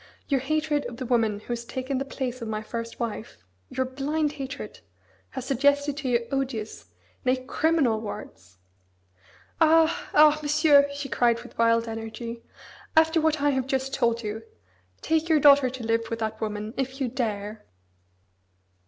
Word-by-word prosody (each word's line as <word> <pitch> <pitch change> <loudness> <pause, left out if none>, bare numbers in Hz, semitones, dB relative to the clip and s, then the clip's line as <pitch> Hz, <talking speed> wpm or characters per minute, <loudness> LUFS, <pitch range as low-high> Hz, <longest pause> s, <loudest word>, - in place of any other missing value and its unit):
Your 275 -2 +2
hatred 305 +2 0
of 240 - -9
the 255 - -5
woman 225 -4 +1
who - - -20
has 235 -1 -2
taken 260 +2 -3
the 275 - -3
place 255 -2 -4
of 230 - -4
my 215 0 -3
first 230 +1 -6
wife 230 - -4 0.3
your 260 - -1
blind 290 +4 -1
hatred 270 -6 -7 0.5
has 260 - -6
suggested 285 +2 +2
to 290 -4 -3
you 235 -1 +1
odious, 260 -6 -3 0.4
nay! 255 -1 +3
criminal 280 -7 +1
words." 95 - -9 1.0
"Ah! 320 +1 +4
Ah! 305 0 +7
Monsieur", 295 -1 +4
she 280 0 -5
cried 235 -2 +1
with 245 - -14
wild 230 0 +3
energy. 225 +1 -6 0.6
"After 320 0 +5
what 310 -2 +1
I 290 - +4
have 265 -1 -1
just 270 0 -1
told 235 0 +1
you, 215 +1 -4 0.6
take 320 +1 +1
your 315 -2 +5
daughter 280 -2 +6
to 255 -1 -7
live 230 0 0
with 230 - -2
that 220 -1 -4
woman 215 0 -3
if 265 0 -3
you 265 - 0
dare." 215 -4 -3
260 Hz, 160 wpm, -26 LUFS, 230-285 Hz, 1.0 s, Ah